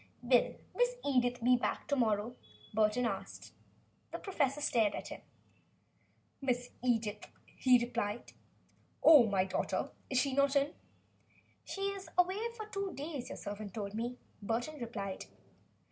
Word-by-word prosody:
"Will 245 0 +4 0.2
Miss - - +2
Edith 245 -3 +1
be 250 +1 +6
back 245 - -2
to 285 - +3
morrow?" 225 -1 +1 0.4
Burton 215 +3 +3
asked. 230 - -5 0.6
The - - -3
professor 295 -8 0
stared 225 -7 +2
at - - -6
him. - - -8 1.2
"Miss 245 -2 -1
Edith?" 220 -4 0 0.3
he 255 -1 +6
repeated. 235 -2 -3 0.7
"Oh! 290 -8 +9
my 195 -2 +2
daughter? 190 - -1 0.2
Is 260 - 0
she 275 0 +1
not 280 +1 +3
in?" 280 +2 +2 0.9
"She 390 - -6
is 390 -3 -8
away 370 +3 +3 0.2
for 435 - -5
two 395 -2 -4
days, 285 -2 -5
your - - -6
servant 205 -1 -6
told 200 -2 -4
me," 240 +3 -3 0.2
Burton 240 +8 -2
replied. 200 -5 -4
245 Hz, 140 wpm, -34 LUFS, 220-285 Hz, 1.2 s, Oh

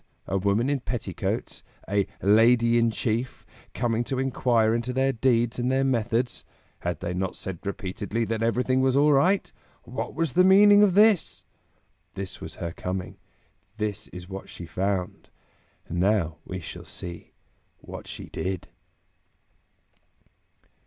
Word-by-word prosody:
A 95 - -3
woman 100 +5 +1
in 140 -1 +1
petticoats, 120 -7 -4 0.3
a 100 0 +1 0.2
"Lady 115 +3 +5
in 115 0 +3
Chief," 115 +2 -2 0.3
coming 120 -1 0
to 135 - -3
inquire 120 -4 +2
into 120 +2 -1
their 135 +1 +2
deeds 120 -1 +1
and 125 +1 0
their 135 +1 +2
methods? 120 -1 0 0.4
Had 85 -3 -3
they 90 - -3
not 95 +1 -2
said 95 -3 -6
repeatedly 100 +2 -3
that 110 0 -2
everything 125 +3 +1
was 130 0 +2
all 145 +1 +5
right? 180 +8 +2 0.3
What 125 +3 -5
was 160 -4 -1
the 180 - +5
meaning 205 +2 +7
of 200 -3 +4
this? 195 - +3 0.7
This 95 -1 -6
was - - -7
her 85 - -4
coming; 90 +2 -5 0.6
this 105 -3 -3
is 90 -1 -10
what 95 0 -8
she 85 - -8
found; 95 +2 -3 0.6
now 85 -2 +1
we 90 - -5
shall 80 - -8
see 85 -1 -9 0.4
what - - -10
she - - -7
did. 95 -1 -4
115 Hz, 140 wpm, -26 LUFS, 95-130 Hz, 0.7 s, meaning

